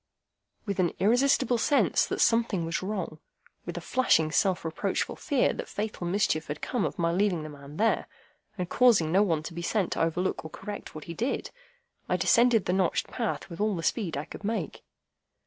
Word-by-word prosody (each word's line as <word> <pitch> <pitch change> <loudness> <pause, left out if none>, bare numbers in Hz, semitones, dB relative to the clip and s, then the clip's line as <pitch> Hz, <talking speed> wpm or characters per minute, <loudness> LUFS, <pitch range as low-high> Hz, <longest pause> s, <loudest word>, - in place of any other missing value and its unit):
With 200 -3 -3
an 175 -2 +2
irresistible 245 +3 +3
sense 285 +5 +3
that - - -3
something 230 -7 +2
was 165 +1 -2
wrong,—with 185 -5 -7
a - - -4
flashing 160 -11 +2
self 185 0 +1
reproachful 165 +4 -2
fear 275 -3 +1
that - - -6
fatal 210 -4 -4
mischief 175 -4 +1
had 150 +1 -4
come 245 -6 -1
of - - -4
my 170 -2 +1
leaving 180 -2 +1
the 155 - -6
man 145 0 -11
there, 225 +3 +1 0.5
and 180 -2 -2
causing 205 -9 +4
no 190 +3 +5
one 165 -7 +1
to 165 - -7
be 170 - -5
sent 190 +2 0
to - - -1
overlook 170 +3 0
or 160 - -7
correct 205 +2 -8
what 155 - -7
he 170 - -7
did,—I 485 - -5
descended 235 -3 +4
the 180 - 0
notched 185 -3 +1
path 230 -3 -3
with 170 0 -7
all 210 -1 +1
the 165 - -4
speed 170 - -1
I 145 - -3
could - - -10
make. 205 -5 -3
190 Hz, 190 wpm, -28 LUFS, 165-225 Hz, 0.5 s, no